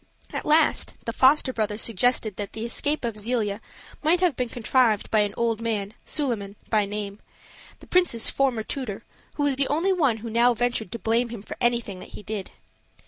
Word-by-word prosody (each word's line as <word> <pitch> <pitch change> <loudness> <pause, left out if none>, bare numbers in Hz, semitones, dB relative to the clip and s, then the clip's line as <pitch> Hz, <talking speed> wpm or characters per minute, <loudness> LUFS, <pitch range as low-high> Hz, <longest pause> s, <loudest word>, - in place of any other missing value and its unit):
At - - -4
last, 310 +2 +3
the 230 - -2
foster 265 +1 +4
brother 210 -2 -1
suggested 225 -1 +1
that 205 -1 -5
the 220 +1 -4
escape 285 +4 -1
of 230 -2 -2
Zelia 215 -1 -1 0.4
might 325 +3 +3
have 350 -6 +2
been 250 -1 -2
contrived 235 -2 +2
by 215 - +4
an 205 -1 +1
old 230 -1 0
man, 215 -3 -2
Suliman 225 -9 -2 0.2
by 215 -2 +3
name, 205 0 -5 0.6
the - - -12
prince's 355 -11 +2
former 260 -5 +1
tutor, 240 -6 -5 0.3
who 290 - -1
was 280 -2 +1
the 275 -1 +2
only 335 +7 +2
one 280 -11 +2
who 230 +1 -7
now 240 +2 +4
ventured 235 -4 -1
to - - -3
blame 230 +2 +1
him 225 -4 -7
for - - -7
anything 235 -6 0
that - - -11
he - - -10
did. 205 -2 -5
230 Hz, 195 wpm, -25 LUFS, 215-260 Hz, 0.6 s, foster